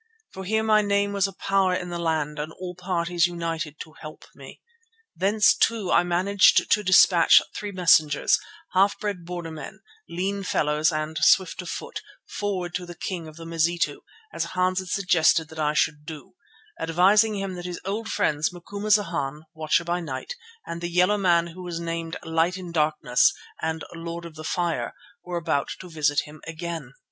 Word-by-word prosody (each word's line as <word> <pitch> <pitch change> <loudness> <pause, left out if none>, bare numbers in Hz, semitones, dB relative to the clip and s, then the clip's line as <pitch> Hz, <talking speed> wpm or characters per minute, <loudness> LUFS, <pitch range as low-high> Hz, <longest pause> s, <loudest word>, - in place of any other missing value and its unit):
For 190 0 -7
here 220 +3 +1
my 215 -1 +4
name 200 0 +1
was 200 -1 +2
a 195 - -9
power 195 -2 +1
in 180 -1 -4
the 170 - -4
land 155 -2 -1
and 155 +1 -4
all 180 -1 -7
parties 175 -1 0
united 165 -3 -4
to 155 - -10
help 155 -1 -10
me. - - -13 0.6
Thence, 210 +2 +4
too, 225 -5 +1
I - - +5
managed 185 +3 +3
to 210 - +4
dispatch 185 -2 +7 0.2
three 205 -1 -5
messengers, 165 -5 +4 0.3
half 195 +2 +3
bred 200 -5 -4
border 175 -2 -6
men, 155 -1 -9 0.3
lean 195 +3 -2
fellows 155 -3 +1
and 155 0 -3
swift 185 -1 +3
of 180 - -8
foot, 475 +2 -6 0.3
forward 185 -4 -3
to 180 0 -4
the 175 - -9
king 170 -1 -5
of 155 - -12
the 165 0 -10
Mazitu, 165 +1 0 0.3
as - - -1
Hans 185 0 +2
had 185 - -6
suggested 170 -4 +2
that 160 - -10
I 150 0 +1
should 150 -1 +1
do, 150 -3 -10 0.5
advising 195 +7 +3
him 195 -1 -3
that 175 -1 -7
his 175 -1 -5
old 215 +4 -3
friends, 150 -5 0
Macumazana, 180 -6 -1
Watcher 155 +1 +1
by 175 +1 -1
Night, 145 - -5 0.3
and 170 0 -6
the 175 - -3
yellow 180 +4 +3
man 170 -3 +3
who 170 +2 -10
was 175 -2 -5
named 165 -1 -4
Light 165 +3 0
in 180 -2 -8
Darkness 150 -6 +3 0.3
and 160 0 -2
Lord 170 0 -6
of 170 - -9
the 155 0 -9
Fire, 170 +1 -2 0.3
were 180 -1 -4
about 150 -4 -1
to 180 -2 -10
visit 150 -2 +1
him 150 +1 -13
again. 165 -5 -6
175 Hz, 180 wpm, -25 LUFS, 160-185 Hz, 0.6 s, dispatch